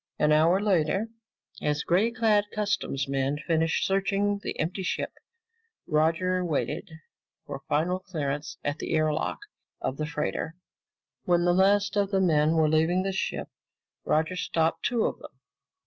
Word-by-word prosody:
An 150 - +3
hour 160 +5 +4
later, 195 +1 +1 0.5
as 150 0 0
gray 190 +7 +3
clad 220 -3 +2
customs 200 -9 -1
men 135 +1 0
finished 160 +1 +1
searching 200 +1 +1
the - - -5
empty 175 +5 -2
ship, 180 - -2 0.7
Roger 165 +4 +1
waited 165 +2 -2 0.6
for 140 -1 -6
final 170 +5 +1
clearance 150 -6 -4
at 145 +2 -2
the - - -2
air 155 -1 +2
lock 155 - -2 0.4
of 130 - -3
the 155 - -2
freighter. 155 +1 -3 0.7
When 175 -1 +3
the 175 - +4
last 200 +2 +3
of 200 -1 +2
the 195 -1 +1
men 160 -3 +3
were 160 -1 +4
leaving 160 +4 +2
the 195 - -1
ship, 190 - -3 0.5
Roger 160 +4 +1
stopped 165 -2 0
two 240 -2 +1
of - - -2
them. - - -13
170 Hz, 150 wpm, -27 LUFS, 155-195 Hz, 0.7 s, hour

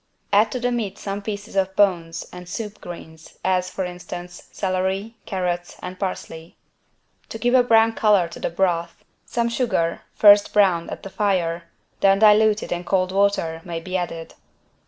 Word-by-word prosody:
Add 210 +2 +4
to 255 - -2
the 245 0 0
meat 215 -5 -3
some 200 0 -5
pieces 205 0 -6
of 190 0 0
bones 170 -4 +1
and 180 0 -10
"soup 210 +1 -6
greens" 160 -2 -11
as, 185 -1 +1
for 190 - -3
instance, 175 0 -8
celery, 190 +3 -2
carrots 175 -2 -2
and 185 0 -8
parsley. 165 -4 -6 0.7
To - - -6
give 245 +2 0
a 255 - +7
brown 225 -2 +4
color 205 -6 +3
to - - -10
the - - -2
broth, 170 -1 -1 0.2
some 235 -1 0
sugar, 235 -9 0
first 205 -1 +6
browned 185 -5 +3
at - - -7
the 195 - -8
fire, 175 -5 0 0.3
then 195 0 +4
diluted 215 0 +4
in 175 0 -2
cold 185 0 0
water, 195 -5 +1
may 170 -2 -5
be 185 +3 -6
added. 165 -2 -4
190 Hz, 165 wpm, -22 LUFS, 175-210 Hz, 0.7 s, a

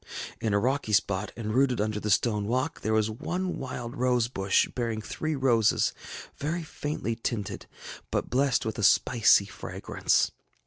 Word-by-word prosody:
In 110 - -1
a 100 - +3
rocky 125 0 0
spot, 100 -1 +1
and 110 -2 -3
rooted 130 -1 +2
under 105 0 -1
the 105 - -3
stone 105 0 +2
walk, 130 +8 -1
there 110 - -1
was 110 0 +2
one 180 +11 -3
wild 125 -3 -5
rose 125 -2 +2
bush 95 -5 +2
bearing 115 -3 -2
three 155 +8 -3
roses 120 -5 +3 0.5
very 165 +4 -2
faintly 145 -6 -3
tinted, 115 -3 -4 0.4
but - - -1
blessed 135 -1 +1
with 110 -1 -3
a - - -2
spicy 105 -1 +5
fragrance. 100 - -1
115 Hz, 155 wpm, -28 LUFS, 105-130 Hz, 0.5 s, spicy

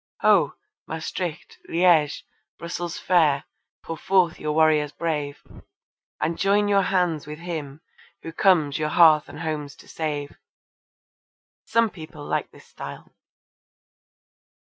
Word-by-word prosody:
Ho! - - +4 0.3
Maestricht, 160 +1 -5
Liege, 165 -4 +3 0.3
Brussels 170 0 -5
fair! 155 -6 +3 0.4
pour 165 - -5
forth 185 -1 +2
your 150 0 -2
warriors 155 -2 +3
brave, 150 -4 -3 0.8
And 165 +2 -1
join 205 +1 +3
your 200 -1 +4
hands 180 -6 0
with 150 0 -7
him 155 -4 -6 0.4
who 165 - -7
comes 165 -6 +3
your 150 0 0
hearths 155 -3 +5
and - - -9
homes 150 -3 -4
to - - -17
save. 150 -3 -4 1.3
Some 230 -1 +2
people 155 -3 -10
like - - -2
this - - -18
style. - - -10
160 Hz, 120 wpm, -24 LUFS, 150-175 Hz, 1.3 s, hearths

